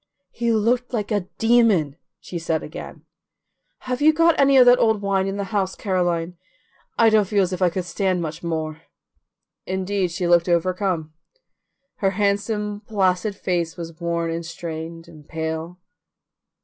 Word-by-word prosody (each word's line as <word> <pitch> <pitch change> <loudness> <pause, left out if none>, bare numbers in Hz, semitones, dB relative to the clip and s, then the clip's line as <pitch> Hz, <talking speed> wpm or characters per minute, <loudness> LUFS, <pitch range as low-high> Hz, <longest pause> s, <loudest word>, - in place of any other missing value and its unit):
"He 235 0 -1
looked 235 +3 +1
like 215 -2 -2
a 205 -4 0
demon!" 225 - +3 0.2
she 175 - -6
said 165 -1 -1
again. - - -9 0.8
"Have 255 +1 -3
you 310 +1 +6
got 330 +1 +4
any 275 -1 +5
of 255 - +8
that 245 0 +6
old 220 -2 +3
wine 195 -1 +1
in 195 +1 -3
the 200 - -2
house, 190 -2 0
Caroline? 175 -3 -1 0.6
I 225 -1 +5
don't 215 -2 +4
feel 200 0 +2
as 185 0 -2
if 185 - -5
I 180 - +4
could 180 +1 -4
stand 185 +1 0
much 160 -1 -5
more." 160 -2 -3 0.9
Indeed, 190 0 -1
she 175 +1 -2
looked 175 0 +4
overcome. 175 -2 0 0.8
Her 195 - +1
handsome 205 0 -1
placid 195 -1 +1
face 175 -3 -2
was 165 0 -8
worn 170 -1 -1
and 165 +1 -3
strained 165 0 -7
and 155 -3 -15
pale. 160 +2 -4
185 Hz, 160 wpm, -22 LUFS, 170-210 Hz, 0.9 s, of